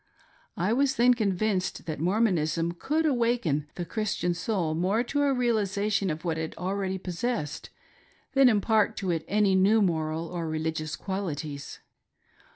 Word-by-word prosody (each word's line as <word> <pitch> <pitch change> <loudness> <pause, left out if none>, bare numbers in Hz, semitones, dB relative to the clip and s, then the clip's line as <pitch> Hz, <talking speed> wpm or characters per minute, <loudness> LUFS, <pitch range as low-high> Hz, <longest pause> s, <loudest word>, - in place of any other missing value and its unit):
I 185 +6 +1
was 275 +2 +2
then 245 +2 +5
convinced 200 -3 -1
that 155 -3 -4
Mormonism 170 -3 +1
could 305 - -1
awaken 235 - +1
the 175 - -4
Chris 215 +4 -2
tian 175 0 0
soul 180 -2 -1
more 190 +8 +1
to 285 +4 -1
a 285 -1 +3
realisation 210 -5 +1
of 160 +2 -4
what 165 -1 -1
it 160 0 -5
already 190 +1 -2
possessed; 180 -2 -3 0.6
than 270 -1 +6
impart 215 -1 +2
to 190 -2 -1
it 165 -2 -1
any 205 -1 +3
new 195 +4 +4
moral 160 -4 0
or 170 -2 -4
reUgious 155 -1 -3
qualities. 155 -7 -5
190 Hz, 150 wpm, -27 LUFS, 165-220 Hz, 0.6 s, than